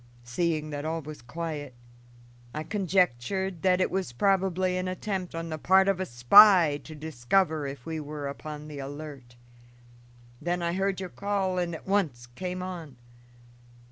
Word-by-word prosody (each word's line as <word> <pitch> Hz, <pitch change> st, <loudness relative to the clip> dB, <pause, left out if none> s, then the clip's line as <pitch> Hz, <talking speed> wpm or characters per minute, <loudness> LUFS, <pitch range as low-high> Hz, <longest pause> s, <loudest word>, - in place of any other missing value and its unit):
Seeing 155 Hz, +4 st, -1 dB
that 145 Hz, 0 st, -4 dB
all 160 Hz, +1 st, -2 dB
was 150 Hz, -1 st, -9 dB
quiet, 145 Hz, 0 st, -5 dB, 0.8 s
I 155 Hz, -, -2 dB
conjectured 185 Hz, -, 0 dB
that 185 Hz, -1 st, +3 dB
it 185 Hz, -, +1 dB
was 190 Hz, -10 st, -2 dB
probably 185 Hz, +3 st, +1 dB
an 185 Hz, 0 st, -2 dB
attempt 185 Hz, -1 st, -3 dB
on 165 Hz, 0 st, -4 dB
the 155 Hz, -1 st, -4 dB
part 190 Hz, +4 st, +5 dB
of 195 Hz, -2 st, +2 dB
a 185 Hz, -, -2 dB
spy 155 Hz, -, +7 dB
to 155 Hz, -, -9 dB
discover 155 Hz, +2 st, 0 dB
if 135 Hz, -2 st, -8 dB
we 160 Hz, -1 st, -3 dB
were 150 Hz, -1 st, -5 dB
upon 150 Hz, +1 st, -7 dB
the 150 Hz, -2 st, -8 dB
alert. 140 Hz, -3 st, -8 dB, 1.1 s
Then 175 Hz, 0 st, -1 dB
I 170 Hz, 0 st, 0 dB
heard 195 Hz, 0 st, 0 dB
your 185 Hz, -1 st, -5 dB
call 195 Hz, -2 st, -1 dB
and 170 Hz, -2 st, -2 dB
at -, -, -10 dB
once 165 Hz, -12 st, 0 dB
came 180 Hz, +9 st, -5 dB
on. 170 Hz, -7 st, -7 dB
165 Hz, 160 wpm, -28 LUFS, 145-185 Hz, 1.1 s, spy